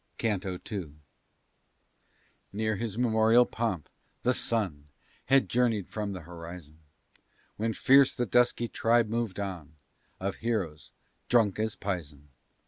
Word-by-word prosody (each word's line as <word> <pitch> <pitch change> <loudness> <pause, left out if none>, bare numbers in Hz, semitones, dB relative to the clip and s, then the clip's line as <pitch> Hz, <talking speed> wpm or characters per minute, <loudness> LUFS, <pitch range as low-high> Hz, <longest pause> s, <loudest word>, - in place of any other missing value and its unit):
CANTO 95 -4 -1
II 90 -8 -5 1.6
Near 110 +1 -1
his 115 -2 -3
meridian 115 0 +4
pomp, 110 - -3 0.4
the 125 - +3
sun 95 -14 -1 0.4
Had 135 +1 +4
journey'd 115 -5 +1
from 105 -2 -4
th' 90 - -8
horizon; 85 -2 -10 0.8
When 110 +1 -1
fierce 135 0 +5
the 120 - 0
dusky 120 +1 +2
tribe 115 0 +2
mov'd 115 -4 -2
on, 90 -6 -5 0.4
Of 95 +1 -3
heroes 100 -10 -3 0.4
drunk 110 -5 +3
as 110 0 0
pison. 75 -7 -5
105 Hz, 120 wpm, -29 LUFS, 90-115 Hz, 1.6 s, fierce